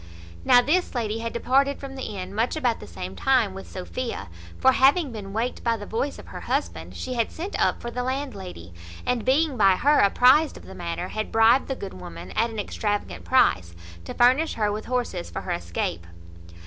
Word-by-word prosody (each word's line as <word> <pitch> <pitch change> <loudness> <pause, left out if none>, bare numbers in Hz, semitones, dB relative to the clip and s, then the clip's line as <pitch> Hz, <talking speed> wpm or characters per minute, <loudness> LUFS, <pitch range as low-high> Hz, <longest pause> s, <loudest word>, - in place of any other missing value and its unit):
Now 245 - +6
this 350 +2 +1
lady 225 -2 -1
had 230 0 -3
departed 275 +4 +1
from 275 -1 -7
the 220 -6 -5
inn 185 +1 -6
much 225 +7 0
about 245 -7 0
the - - -10
same 90 +2 -7
time 245 - +2
with 195 0 -9
Sophia; 210 - -5 0.3
for, 260 - +5
having 275 +3 +4
been 205 -3 -7
waked 230 +4 -2
by 230 -1 +1
the 205 - -8
voice 255 +7 -2
of - - -12
her - - -7
husband, 85 +1 -3
she 255 - -4
had 230 -2 0
sent 365 +5 -5
up - - +2
for 235 - -6
the 250 - -3
landlady, 200 - -5 0.3
and 250 -3 0
being 275 +1 +2
by 195 -3 +5
her 290 +8 +3
apprized 255 +9 +5
of - - -13
the 190 - -10
matter, 175 0 -4
had 215 0 -4
bribed 225 +4 +5
the 270 - -2
good 200 -5 -7
woman, 85 +1 -9
at 230 +1 +1
an 225 - -8
extravagant 205 0 -3
price, 90 - +3 0.3
to - - -7
furnish 260 +7 +4
her 210 -2 +1
with 215 +1 -4
horses 245 - -2
for - - -5
her - - -5
escape. 85 0 -3
230 Hz, 205 wpm, -25 LUFS, 190-260 Hz, 0.3 s, Now